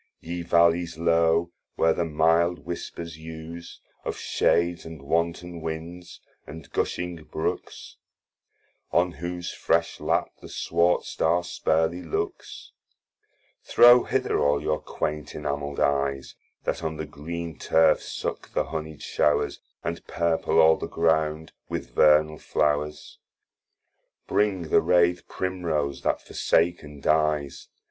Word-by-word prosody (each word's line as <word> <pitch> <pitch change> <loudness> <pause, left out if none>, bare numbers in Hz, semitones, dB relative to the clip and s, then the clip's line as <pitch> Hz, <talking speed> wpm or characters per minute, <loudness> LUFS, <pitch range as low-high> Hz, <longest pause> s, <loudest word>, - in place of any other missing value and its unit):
Ye 85 +1 -5
valleys 85 0 +3
low 85 0 +2 0.2
where 80 0 +3
the 85 - -1
milde 80 +2 +2
whispers 85 -2 -6
use, 80 +1 -9 0.2
Of - - -4
shades 85 0 +1
and 80 -3 -10
wanton 85 +3 -1
winds, 80 +2 -7 0.3
and 80 -1 -10
gushing 90 -1 -2
brooks, 80 - -4 0.9
On 90 +1 +3
whose 85 +2 -5
fresh - - 0
lap - - 0
the - - -11
swart 85 +1 +1
Star 85 +2 0
sparely 80 0 0
looks, 85 -3 -5 0.9
Throw 120 +1 +7
hither - - 0
all 70 0 +3
your 75 +1 -1
quaint 75 -1 -4
enameld 70 -1 -3
eyes, 70 -1 0 0.3
That 80 - -2
on 80 -1 -3
the 80 - -4
green 80 +2 -6
terf 80 0 +4
suck - - -5
the - - +2
honied 80 0 -6
showres, 75 - +1 0.2
And 85 +1 -4
purple 85 -1 0
all 80 0 +6
the - - -5
ground 80 -1 0 0.2
with - - -4
vernal 75 +2 +4
flowres. 75 0 -1 1.1
Bring 95 -6 0
the - - +5
rathe 90 0 +2
Primrose 80 -7 -2
that - - -1
forsaken 80 -4 0
dies. 75 -2 +1
80 Hz, 120 wpm, -26 LUFS, 75-85 Hz, 1.1 s, Throw